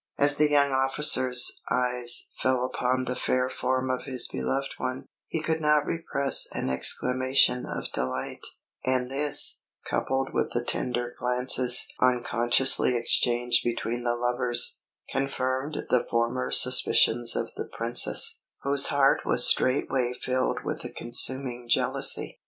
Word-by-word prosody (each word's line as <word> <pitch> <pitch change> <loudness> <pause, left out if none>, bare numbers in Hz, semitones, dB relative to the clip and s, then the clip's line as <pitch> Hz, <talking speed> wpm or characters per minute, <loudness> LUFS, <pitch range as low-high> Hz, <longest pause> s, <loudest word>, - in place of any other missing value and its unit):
As 145 0 +3
the 150 0 +2
young 140 -1 +2
officer's 130 -2 +2
eyes 125 -1 +1
fell 130 -1 0
upon 130 0 -2
the 125 0 -3
fair 130 0 -1
form 130 0 -2
of 130 - -4
his 130 -3 0
beloved 135 - -4
one, 130 +1 -5 0.2
he 160 - -4
could 160 0 -2
not 150 -1 +2
repress 140 -4 0
an - - -3
exclamation 125 - +1
of - - -6
delight; 65 +1 -5 0.4
and 130 0 -1
this, 145 +1 +2 0.2
coupled 135 0 -2
with - - -2
the 120 0 -2
tender 120 -1 -3
glances 125 0 +3
unconsciously 125 0 +2
exchanged 120 +1 +1
between 120 0 -3
the 120 0 -1
lovers, 120 0 0 0.3
confirmed 135 +1 -3
the 125 - +2
former 120 +2 -1
suspicions 120 -2 +3
of - - -4
the - - -7
Princess, 115 +1 0 0.2
whose 140 0 +3
heart 140 -1 +2
was - - +4
straightway 130 -1 0
filled 130 0 -2
with - - -5
a - - -6
consuming 125 0 -2
jealousy. - - 0
125 Hz, 135 wpm, -26 LUFS, 120-135 Hz, 0.4 s, was